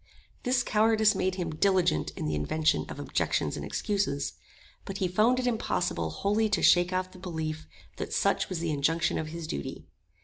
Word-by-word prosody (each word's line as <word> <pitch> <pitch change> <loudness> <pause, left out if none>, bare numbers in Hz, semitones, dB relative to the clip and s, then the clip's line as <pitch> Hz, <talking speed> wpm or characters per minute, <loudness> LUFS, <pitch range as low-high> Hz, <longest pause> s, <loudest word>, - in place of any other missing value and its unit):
This 250 0 +1
cowardice 220 -1 +3
made 185 0 0
him 175 -3 -3
diligent 175 - +2
in - - -3
the 75 - -1
invention 155 - +1
of - - -7
objections - - -1
and - - -5
excuses; 195 -9 -1 0.5
but 195 - -6
he 190 - 0
found 215 +8 +3
it 255 - -1
impossible 180 - 0
wholly 210 - +1
to 205 -4 0
shake 175 0 +5
off 185 0 -1
the 185 - -13
belief 160 -3 -4 0.3
that - - -5
such - - +1
was 185 - -2
the 165 -1 -1
injunction 160 +4 +1
of 155 - -3
his 165 +1 -6
duty. 70 - -5
180 Hz, 180 wpm, -28 LUFS, 155-205 Hz, 0.5 s, shake